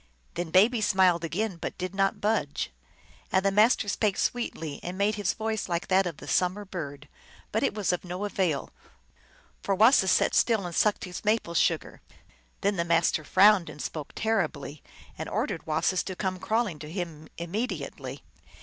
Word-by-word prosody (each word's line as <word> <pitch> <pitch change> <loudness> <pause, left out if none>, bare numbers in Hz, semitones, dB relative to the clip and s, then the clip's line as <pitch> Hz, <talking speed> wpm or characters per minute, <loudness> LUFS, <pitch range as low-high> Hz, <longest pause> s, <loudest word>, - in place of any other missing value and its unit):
Then 175 -1 -3
Baby 215 +7 +4
smiled 185 -4 +3
again, 190 +3 -2
but - - -5
did 185 0 -4
not 195 0 +1
budge. 210 - -1 0.6
And 190 +1 +2
the 195 - +4
Master 215 +2 +4
spake 205 0 0
sweetly 160 -11 -2
and 180 +2 -6
made 200 +2 +2
his 205 -1 0
voice 220 -3 -2
like 170 -1 -2
that 190 0 +4
of 165 -4 -5
the - - -11
summer 185 +3 +1
bird, 145 -6 -7 0.4
but 220 - 0
it - - 0
was 205 -4 0
of 180 - -3
no 180 +3 -4
avail, 180 -9 -1 0.9
for 195 - 0
Wasis 215 -2 +5
sat - - +3
still 220 -5 +3
and 175 - -5
sucked 210 +4 +2
his 180 -1 -7
maple 210 -5 +1
sugar. 170 - 0 0.6
Then 200 0 +1
the 170 - +1
Master 165 -2 +2
frowned 195 +2 +5
and - - -10
spoke 150 0 -5
terribly, 160 -10 -1 0.4
and - - -4
ordered - - -2
Wasis 165 +4 +1
to 190 - -5
come 185 -1 -2
crawling 215 -6 -1
to 150 +1 -8
him 165 -4 -5
immediately. 200 +9 -4
185 Hz, 175 wpm, -27 LUFS, 170-210 Hz, 0.9 s, Wasis